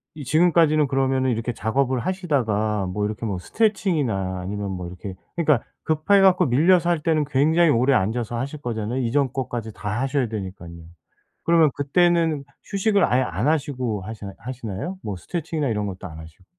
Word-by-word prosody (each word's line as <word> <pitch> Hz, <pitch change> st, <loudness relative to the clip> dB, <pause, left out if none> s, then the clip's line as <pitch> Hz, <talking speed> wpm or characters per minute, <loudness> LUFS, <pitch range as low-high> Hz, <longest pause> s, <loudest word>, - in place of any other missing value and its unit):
이 150 Hz, -, -7 dB
지금까지는 155 Hz, 0 st, +4 dB
그러면은 130 Hz, -1 st, +1 dB
이렇게 115 Hz, +1 st, -2 dB
작업을 130 Hz, +4 st, 0 dB
하시다가 115 Hz, -, 0 dB
뭐 105 Hz, +3 st, -2 dB
이렇게 105 Hz, +2 st, -4 dB
뭐 100 Hz, -4 st, -2 dB
스트레칭이나 130 Hz, -, 0 dB
아니면 100 Hz, +2 st, -4 dB
뭐 90 Hz, -2 st, -5 dB
이렇게 90 Hz, +2 st, -8 dB, 0.2 s
그러니까 150 Hz, -7 st, +2 dB, 0.2 s
급해 160 Hz, +6 st, +3 dB
갖고 185 Hz, -1 st, +5 dB
밀려서 170 Hz, +7 st, +4 dB
할 170 Hz, -2 st, +2 dB
때는 155 Hz, -2 st, +1 dB
굉장히 155 Hz, +4 st, +3 dB
오래 130 Hz, +2 st, +3 dB
앉아서 115 Hz, +3 st, -1 dB
하실 140 Hz, +4 st, -4 dB
거잖아요. 115 Hz, +1 st, -3 dB
이전 130 Hz, +2 st, 0 dB
거까지 120 Hz, -4 st, -4 dB
다 105 Hz, +5 st, -3 dB
하셔야 135 Hz, -1 st, 0 dB
되니깐요. 95 Hz, -5 st, -7 dB, 0.6 s
그러면 165 Hz, -2 st, +5 dB
그때는 165 Hz, 0 st, +2 dB, 0.2 s
휴식을 200 Hz, 0 st, +2 dB
아예 125 Hz, +2 st, +2 dB
안 105 Hz, -, -1 dB
하시고 130 Hz, -9 st, -1 dB
하시나 105 Hz, -1 st, -7 dB
하시나요? 120 Hz, -, -5 dB
뭐 105 Hz, -, -4 dB
스트레칭이나 155 Hz, -, -3 dB
이런 105 Hz, -2 st, -1 dB
것도 95 Hz, -2 st, -6 dB
안 80 Hz, -2 st, -10 dB
하시고. 80 Hz, +3 st, -13 dB
130 Hz, 420 characters per minute, -23 LUFS, 105-155 Hz, 0.6 s, 갖고